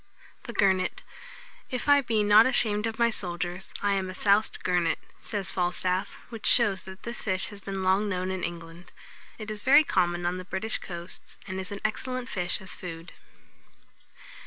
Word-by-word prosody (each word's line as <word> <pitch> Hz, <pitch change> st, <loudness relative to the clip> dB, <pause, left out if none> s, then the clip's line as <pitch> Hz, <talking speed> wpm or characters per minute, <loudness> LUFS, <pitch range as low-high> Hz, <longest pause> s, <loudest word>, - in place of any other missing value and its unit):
[Illustration: -, -, -28 dB
THE 235 Hz, -, -6 dB
GURNET.] 190 Hz, -3 st, +3 dB
THE -, -, -14 dB, 0.7 s
GURNET. -, -, -4 dB
"If -, -, -8 dB
I 285 Hz, 0 st, +7 dB
be 225 Hz, -4 st, +1 dB
not 210 Hz, +3 st, +7 dB
ashamed 215 Hz, -4 st, +3 dB
of 225 Hz, 0 st, -5 dB
my 235 Hz, -1 st, +3 dB
soldiers, 175 Hz, -1 st, -4 dB
I 205 Hz, -1 st, +3 dB
am 190 Hz, -1 st, -1 dB
a 185 Hz, -, -6 dB
souced 205 Hz, +2 st, +2 dB
gurnet," 175 Hz, -2 st, +1 dB, 0.2 s
says 205 Hz, -3 st, -3 dB
Falstaff; 180 Hz, +1 st, -1 dB
which 225 Hz, -2 st, -3 dB
shows 205 Hz, -7 st, +3 dB
that 190 Hz, +1 st, -11 dB
this 235 Hz, 0 st, -3 dB
fish 185 Hz, -3 st, 0 dB
has 205 Hz, -1 st, -9 dB
been 195 Hz, -1 st, -4 dB
long 190 Hz, +3 st, +2 dB
known 185 Hz, -1 st, -2 dB
in 190 Hz, -1 st, -3 dB
England. 170 Hz, 0 st, -7 dB, 0.5 s
It 215 Hz, -1 st, -6 dB
is 210 Hz, -1 st, -4 dB
very 280 Hz, +6 st, +7 dB
common 175 Hz, -, 0 dB
on 180 Hz, +1 st, -1 dB
the -, -, -6 dB
British 190 Hz, +5 st, -2 dB
coasts, 175 Hz, 0 st, -7 dB
and 190 Hz, 0 st, -4 dB
is 190 Hz, -, -5 dB
an 200 Hz, -, -6 dB
excellent 255 Hz, +3 st, -2 dB
fish 180 Hz, -2 st, 0 dB
as 190 Hz, -, -3 dB
food. 165 Hz, -1 st, -8 dB
190 Hz, 190 wpm, -27 LUFS, 180-215 Hz, 0.7 s, I